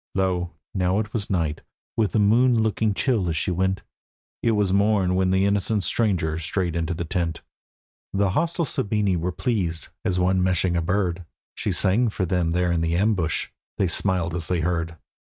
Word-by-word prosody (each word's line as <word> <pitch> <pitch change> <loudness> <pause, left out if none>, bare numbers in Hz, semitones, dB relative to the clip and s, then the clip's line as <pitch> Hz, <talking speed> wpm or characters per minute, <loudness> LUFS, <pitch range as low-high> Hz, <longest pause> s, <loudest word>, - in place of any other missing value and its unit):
Lo, 90 -2 0 0.2
now 90 0 +1
it 105 0 -2
was 105 -3 -2
night, 80 -5 -1 0.3
with 110 -3 +1
the - - +2
moon 115 +3 +4
looking 110 0 +1
chill 110 -9 +1
as 80 - -1
she 90 - 0
went: 95 +2 0 0.6
It 115 - +2
was 100 -3 +1
morn 100 -2 +3
when 95 0 +2
the 95 +1 +3
innocent 100 +1 +1
stranger 85 -9 0
strayed 85 +1 -1
into 85 0 -1
the 85 - -3
tent. 85 -1 -2 0.7
The 100 -1 +1
hostile 170 - 0
Sabini 105 -6 0
were 85 +2 -1
pleased, 90 -7 -2
as 90 - 0
one 90 +1 +2
meshing 90 -1 +1
a 85 - +1
bird; 90 0 -1 0.3
She - - -2
sang 110 +6 +2
for 100 -2 -2
them 85 -1 0
there 90 0 +1
in 85 -1 +1
the 85 0 0
ambush: 95 -5 +1 0.3
they 95 - +2
smiled 90 -1 +1
as 85 -2 -2
they 90 -2 0
heard. 85 0 -2
95 Hz, 185 wpm, -24 LUFS, 85-105 Hz, 0.7 s, moon